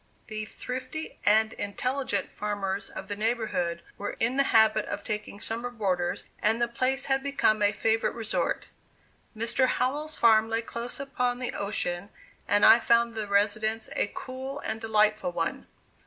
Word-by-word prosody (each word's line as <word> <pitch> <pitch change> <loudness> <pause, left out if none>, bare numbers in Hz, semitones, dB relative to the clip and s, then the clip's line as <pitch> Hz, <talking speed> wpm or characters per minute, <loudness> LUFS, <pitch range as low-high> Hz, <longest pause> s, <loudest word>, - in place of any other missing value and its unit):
The 215 0 -5
thrifty 255 +7 -6
and 220 +1 +5
intelligent 250 +1 -2
farmers 205 -2 -3
of 190 - -8
the 205 - -3
neighborhood 210 -6 -1 0.2
were 205 - -4
in 235 +3 +1
the 275 0 +3
habit 220 -1 +4
of - - -4
taking 210 -1 -4
summer 230 +3 -2
boarders, 190 -7 -1 0.2
and 220 +2 +3
the 240 - +2
place 255 +3 +1
had 270 0 +1
become 270 -6 +1
a 205 0 +4
favorite 225 +2 0
resort. 225 -2 -2 0.7
Mr. 235 +4 +2
Howell's 295 +5 -1
farm 225 -1 +5
lay 225 +1 0
close 235 +2 -5
upon 250 -3 -1
the 250 0 -3
ocean 200 -2 -2 0.4
and 205 0 +4
I 235 - +9
found 235 0 +3
the 215 -2 -4
residence 215 +2 +1
a 205 - 0
cool 265 +2 -6
and 220 - -3
delightful 215 -4 +2
one. 165 -1 -2
220 Hz, 155 wpm, -28 LUFS, 205-245 Hz, 0.7 s, I